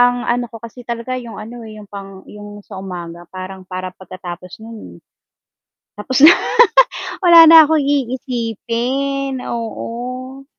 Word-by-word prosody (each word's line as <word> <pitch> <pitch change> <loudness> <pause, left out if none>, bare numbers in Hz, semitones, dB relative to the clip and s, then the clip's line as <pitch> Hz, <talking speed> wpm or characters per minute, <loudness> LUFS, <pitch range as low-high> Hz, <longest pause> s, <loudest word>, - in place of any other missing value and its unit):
Ang 245 0 +3
ano 245 +1 0
ko 230 - -11
kasi 230 +2 -11
talaga 235 +2 -4
yung 230 -3 -10
ano 230 +3 -9
eh, 215 - -11
yung 210 - -11
pang 195 -1 -11
yung 205 0 -12
sa 190 - -9
umaga 175 -2 -8
parang 190 +1 -8
para 185 0 -7
pagkatapos 180 -1 -10
nun, 215 - -12 0.9
tapos 245 +6 -2
na 345 - +9 0.9
wala 335 -2 +9
na 320 -1 +9
kong 315 0 +2
iisipin, 260 0 -2
oo. 250 +3 -6
230 Hz, 135 wpm, -17 LUFS, 195-255 Hz, 0.9 s, na